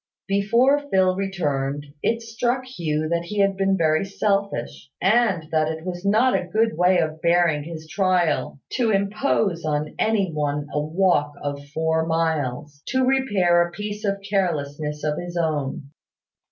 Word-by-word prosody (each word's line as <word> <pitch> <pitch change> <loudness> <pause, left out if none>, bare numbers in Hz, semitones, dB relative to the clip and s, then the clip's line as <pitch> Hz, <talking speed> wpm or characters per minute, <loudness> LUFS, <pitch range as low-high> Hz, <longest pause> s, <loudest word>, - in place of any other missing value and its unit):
Before 240 +9 +2
Phil 185 -3 +3
returned, 145 -7 -2 0.2
it 230 0 0
struck 240 +3 -1
Hugh 155 -11 -2
that 170 0 -1
he 210 +4 -6
had 195 -1 +3
been 195 0 +1
very 160 0 +2
selfish; 195 - -2
and 195 -4 +2
that 155 -1 +2
it 160 +1 -7
was 175 -1 -5
not 220 +6 +3
a - - +1
good 220 +2 +1
way 180 +2 +4
of 160 -2 -1
bearing 170 -3 +3
his 160 -1 -8
trial 175 -5 0
to 240 -3 +1
impose 200 -3 0
on 150 -1 -2
any 205 -5 +1
one 145 -1 -2
a 150 - 0
walk 155 -2 +1
of 140 0 -4
four 160 +2 0
miles, 150 -4 -1
to 260 0 +1
repair 205 -10 +3
a 175 - +1
piece 210 +2 -6
of 200 -1 -1
carelessness 150 -6 -2
of 150 -1 -1
his 175 0 -6
own. 145 -4 -2
175 Hz, 155 wpm, -23 LUFS, 155-200 Hz, 0.2 s, way